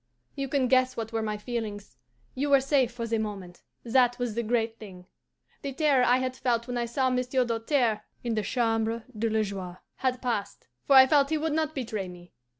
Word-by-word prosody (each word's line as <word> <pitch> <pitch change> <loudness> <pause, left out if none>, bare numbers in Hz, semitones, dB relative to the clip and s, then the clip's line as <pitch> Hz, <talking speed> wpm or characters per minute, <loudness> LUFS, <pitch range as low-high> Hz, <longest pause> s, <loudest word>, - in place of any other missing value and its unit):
"You 275 0 -3
can 270 -1 +1
guess 255 0 +3
what 225 0 -4
were 225 - 0
my 215 -1 -2
feelings. 210 - -5 0.4
You 285 +3 -1
were 275 -1 +6
safe 265 -2 +2
for 235 -1 -5
the 225 -1 -1
moment 195 -5 -6 0.2
that 245 0 +3
was 245 -3 -2
the 235 - -1
great 230 0 -1
thing. 185 -4 -11 0.6
The 280 -1 -4
terror 280 -3 +3
I 250 0 +4
had 255 0 -2
felt 235 -3 0
when 245 0 -5
I 235 - -1
saw 260 +2 0
Monsieur 255 0 +1
Doltaire 230 -1 0 0.2
in 235 -1 -1
the 215 - 0
Chambre 225 0 0
de 225 +2 0
la 220 0 +1
Joie 190 -3 -6 0.2
had 255 -1 -1
passed, 210 -6 -3 0.2
for 275 - +5
I 260 0 +10
felt 280 0 +3
he 315 - +1
would 310 0 -1
not 315 0 -1
betray 220 -7 -3
me. 175 0 -13
235 Hz, 210 wpm, -27 LUFS, 220-260 Hz, 0.6 s, I